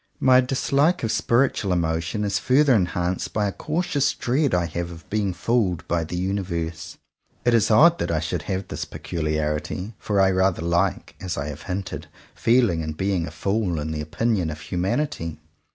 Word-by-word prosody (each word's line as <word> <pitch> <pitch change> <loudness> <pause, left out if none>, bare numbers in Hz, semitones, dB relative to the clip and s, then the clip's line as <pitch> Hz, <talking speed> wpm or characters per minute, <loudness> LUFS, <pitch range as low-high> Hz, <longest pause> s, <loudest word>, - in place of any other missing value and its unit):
My 130 -1 +6
dislike 140 +6 +1
of 110 - 0
spiritual 115 -5 +1
emotion 85 +3 0
is 100 -1 0
further 135 +2 +4
enhanced 90 -3 0
by 105 -1 +1
a - - -1
cautious 155 - 0
dread 135 +3 +1
I 90 -1 +2
have 85 +2 -4
of 85 -4 -11
being 105 -2 0
fooled 90 -3 0
by 85 -1 0
the 85 - -5
Universe. 90 -3 -3 0.5
It 120 - +4
is 115 -4 +3
odd 165 +10 +6
that - - -1
I 80 -2 +1
should 80 -1 -2
have 95 0 -2
this - - -4
peculiarity; 75 +4 -3
for 105 -2 0
I 95 0 +5
rather 95 -2 +1
like, 85 +3 0
as 90 -2 -3
I 70 +1 -3
have 75 +1 -7
hinted, 90 -4 -4 0.3
feeling 115 -8 +2
and 80 -1 -5
being 95 -3 0
a - - -7
fool 95 +1 -1
in 75 +1 -3
the 75 -1 -3
opinion 95 +3 0
of 75 0 -6
humanity. 90 - -2
95 Hz, 180 wpm, -24 LUFS, 85-115 Hz, 0.5 s, My